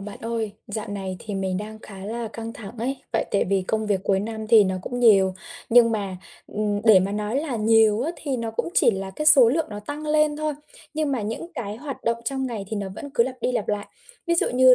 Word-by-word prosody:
bạn 200 +1 -8
ơi, 225 -2 -3
dạo 210 0 -5
này 195 -2 -4
thì 210 - -6
mình 190 -1 -1
đang 215 +2 -6
khá 195 -3 -10
là 230 +2 -4
căng 230 0 -6
thẳng 210 -1 -9
ấy, 260 +4 -2 0.2
tại - - +1
tại 200 - +2
vì 195 0 +1
công 215 +3 -1
việc 200 -3 +1
cuối 195 -1 +2
năm 220 +1 -5
thì 220 -2 +7
nó 190 -1 -1
cũng 245 +5 -4
nhiều, 195 -5 +5 0.3
nhưng 235 0 +6
mà, 200 -4 -2 0.3
ừm, 205 -1 -1
để 215 -4 +7
mà 195 +2 -1
nói 210 +5 -1
là 290 -6 -3
nhiều 220 0 +4
á, 310 - -1
thì 275 -4 -3
nó 230 -2 -3
cũng 225 - -2
chỉ - - +5
là 195 -2 -4
cái 305 +11 -4
số 265 -6 +8
lượng 310 +6 +1
nó 205 0 -6
tăng 290 +8 -6
lên 305 0 +2
thôi, 305 0 -1 0.4
nhưng 305 -2 0
mà 250 -5 -1
những 225 - -5
cái 215 -6 -4
hoạt 275 +1 -7
động 230 0 +2
trong 265 +2 -1
ngày 225 -5 -4
thì 220 - -3
nó 200 -1 -3
vẫn 285 - -8
cứ 235 - +5
lặp 260 +1 -4
đi 250 - 0
lặp 220 - -2
lại. 205 -1 -1 0.4
Ví 340 - +2
dụ 335 - +3
như 255 0 +7
220 Hz, 255 wpm, -24 LUFS, 205-255 Hz, 0.4 s, số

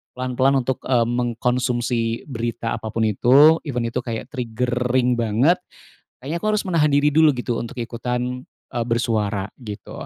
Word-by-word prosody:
Pelan-pelan 130 +1 +1
untuk, 130 +1 -2
eee, 120 -3 +3
mengkonsumsi 120 -1 -1
berita 115 -1 -3
apa 110 - -7
pun 110 +1 -1
itu, 135 +9 +5
even 125 -4 -2
itu 115 +2 -2
kayak 115 -2 -5
triggering 125 0 0
banget. 120 +11 +2 0.6
Kayaknya 150 +6 -3
aku - - 0
harus 210 - 0
menahan 155 -4 +3
diri 145 +1 +4
dulu, 155 0 +4
gitu, 125 -1 -3
untuk 120 - -6
ikutan, 125 +2 -3 0.2
eee, 120 -1 -2
bersuara," 110 -4 -1
gitu. 105 -5 -8
125 Hz, 150 wpm, -22 LUFS, 115-130 Hz, 0.6 s, itu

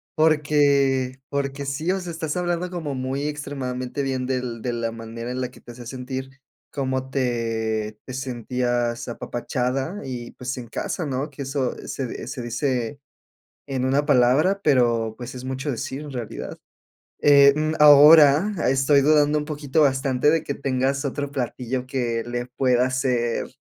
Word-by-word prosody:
Porque 140 -4 +2
porque 140 0 -3
sí, 155 +6 -1
o 190 - 0
sea, 180 -2 -6
estás 160 -2 -4
hablando 175 0 -1
como 160 -6 -4
muy 130 +3 -2
extremadamente 135 -3 -4
bien 130 -2 -2
del 125 -3 -3
de 125 - -1
la 115 -1 -2
manera 115 +1 -7
en 125 +1 -3
la 125 -1 -3
que - - -17
te - - -11
hacía 120 0 -11
sentir, 130 +2 -6 0.4
cómo 130 -1 -2
te 110 -4 -1
te 130 - -8
sentías 120 -2 -2
apapachada 130 - -3
y, 125 -3 -6
pues, 130 +2 -5
en 120 -2 -7
casa 160 +8 -3
¿no? 140 +1 -2
Que 140 -1 -7
eso 135 -1 -2
se, 130 -3 -5
eh, - - -8
se 130 0 -5
dice 125 +1 -2 0.7
en 135 -2 -2
una 140 +3 +1
palabra 145 +8 +3
pero, 120 -5 +2
pues, 120 0 -7
es 125 0 -8
mucho 130 +2 -3
decir 135 +2 -4
en 150 - -8
realidad. 120 -4 -6 0.7
Eh, 140 -1 +7
mm, 155 +1 0
ahora 150 +5 +8 0.2
estoy 135 +2 +4
dudando 150 +1 +4
un 150 - -5
poquito 150 0 -1
bastante 135 -1 +2
de 160 +1 +2
que 140 - -3
tengas 135 0 -1
otro 140 +1 -3
platillo 125 -1 -3
que 120 -3 -1
le 120 0 -3
pueda 125 0 +1
ser, 125 -3 0
130 Hz, 165 wpm, -23 LUFS, 125-145 Hz, 0.7 s, ahora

